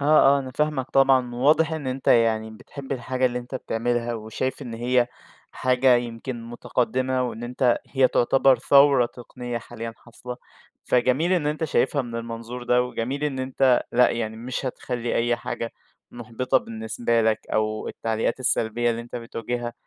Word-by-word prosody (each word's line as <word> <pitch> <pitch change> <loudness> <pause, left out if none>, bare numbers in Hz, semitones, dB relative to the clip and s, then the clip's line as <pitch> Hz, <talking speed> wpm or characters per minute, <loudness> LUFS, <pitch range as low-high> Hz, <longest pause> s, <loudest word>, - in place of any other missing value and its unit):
آه، 140 - -2 0.3
آه، - - +1
أنا 130 -1 -5
فاهمك 150 -4 0
طبعًا 130 -3 +3
واضح 155 +6 +3
إن 155 -4 -4
أنت 130 +1 -3
يعني 110 -1 +3
بتحب 135 +5 -8
الحاجة 130 0 0
اللي 125 0 -2
أنت 125 +2 -9
بتعملها، 120 -1 -1
وشايف 115 +5 -4
إن 120 -3 -6
هي 120 +1 +2 0.5
حاجة 130 0 +3
يمكن 120 0 -5
متقدمة، 130 +2 -1
وإن 120 -1 -4
أنت 125 0 +1
هي 130 -2 +3
تعتبر 135 +1 +3
ثورة 140 -3 +5
تقنية 120 0 -7
حاليًا 115 -1 -7
حاصلة، 125 +1 -9 0.5
فجميل 130 +8 +2
إن 165 -5 +1
أنت 155 +2 -1
شايفها 145 -2 +1
من 115 -1 -6
المنظور 115 +1 -6
ده، 125 0 +3
وجميل 125 +4 -3
إن 135 -3 -2
أنت 130 -1 +2
لأ، 125 +1 +5
يعني 110 -2 -3
مش 125 +3 -4
هتخلي 120 -1 -3
أي 120 0 +1
حاجة 115 - -5 0.4
محبطة 120 +2 -1
بالنسبة 115 +1 -1
لك 110 0 +2
أو 110 0 -1
التعليقات 115 +3 -2
السلبيّة 120 -1 +1
اللي 115 - -2
أنت 120 +1 -8
بتواجهها 120 +1 -4
125 Hz, 160 wpm, -24 LUFS, 115-130 Hz, 0.5 s, ثورة